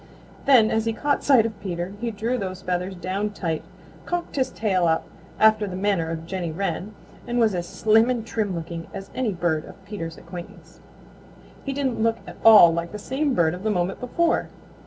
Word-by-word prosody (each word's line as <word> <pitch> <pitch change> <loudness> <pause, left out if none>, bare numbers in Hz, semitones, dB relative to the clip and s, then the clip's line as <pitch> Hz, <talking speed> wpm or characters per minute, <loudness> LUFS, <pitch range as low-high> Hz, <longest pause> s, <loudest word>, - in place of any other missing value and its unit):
Then 240 -6 +6
as 220 0 +1
he 225 - 0
caught 285 +6 0
sight 255 -6 +5
of 220 -2 -5
Peter 180 -1 -4
he 240 - -1
drew 225 +3 -2
those 190 -4 -4
feathers 180 +1 -2
down 195 +4 -3
tight, 165 -5 -2 0.5
cocked 350 -1 -3
his 265 -2 +1
tail 185 -5 +1
up 160 0 +1 0.3
after 215 -1 +5
the 185 - -5
manner 190 -4 0
of 165 0 -5
Jenny 175 -2 -3
Wren, 195 +4 -3 0.3
and 240 - -1
was 225 -3 +3
as 175 -1 -3
slim 220 +2 +3
and 240 -3 -1
trim 210 -5 -2
looking 165 0 -6
as 195 - -8
any 250 -4 -1
bird 170 -4 0
of 195 - -14
Peter's 165 -5 -6
acquaintance. 175 -1 -11 0.8
He 275 - -3
didn't 265 -4 -1
look 225 0 +2
at - - -10
all 210 -7 +9
like 170 +2 -3
the - - -4
same 265 +6 -1
bird 160 -1 +3
of 180 - -7
the 215 - -1
moment 185 -2 -1
before. 330 +7 0
200 Hz, 200 wpm, -24 LUFS, 175-225 Hz, 0.8 s, all